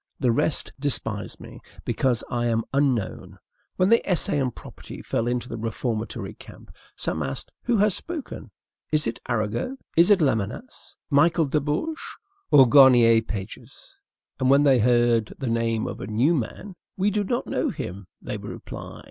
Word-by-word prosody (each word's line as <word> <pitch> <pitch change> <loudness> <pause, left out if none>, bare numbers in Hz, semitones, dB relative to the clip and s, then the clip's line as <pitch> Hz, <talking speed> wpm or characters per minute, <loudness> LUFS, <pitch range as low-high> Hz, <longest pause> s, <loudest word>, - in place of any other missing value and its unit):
The 125 -4 +2
rest 135 +6 0
despise 115 -7 0
me, - - -11 0.3
because 125 -3 0
I 120 0 -1
am 115 -1 +1
unknown. 135 -8 -1 0.4
When 185 +1 +2
the 230 +1 +5
"Essay 170 -4 0
on 130 - +1
Property" - - -11
fell 115 - -1
into 125 0 -1
the 115 - -6
reformatory 115 0 -3
camp, - - -14 0.2
some 80 - -3
asked: 70 -2 -4
"Who 240 -2 +2
has 205 0 +3
spoken? 325 - -5 0.4
Is 155 -1 +2
it 115 - -3
Arago? 120 - -2 0.2
Is 170 +3 +5
it 205 - +7
Lamennais? 130 - -2 0.2
Michel 160 +3 +4
de 150 +2 0
Bourges 155 - -2 0.5
or 135 -3 +7
Garnier 120 -3 +7
Pages?" 115 - -9 0.4
And 130 -1 +2
when 140 +2 +5
they 135 -3 +5
heard 120 -1 +2
the 135 - -5
name 115 -1 0
of - - -6
a 95 - -5
new 120 +10 +2
man: 170 - -4 0.2
"We 195 +2 +1
do 205 +1 0
not 240 +5 -2
know - - -1
him," 95 +1 -6
they - - -5
would - - -8
reply. - - -9
125 Hz, 165 wpm, -24 LUFS, 115-160 Hz, 0.5 s, it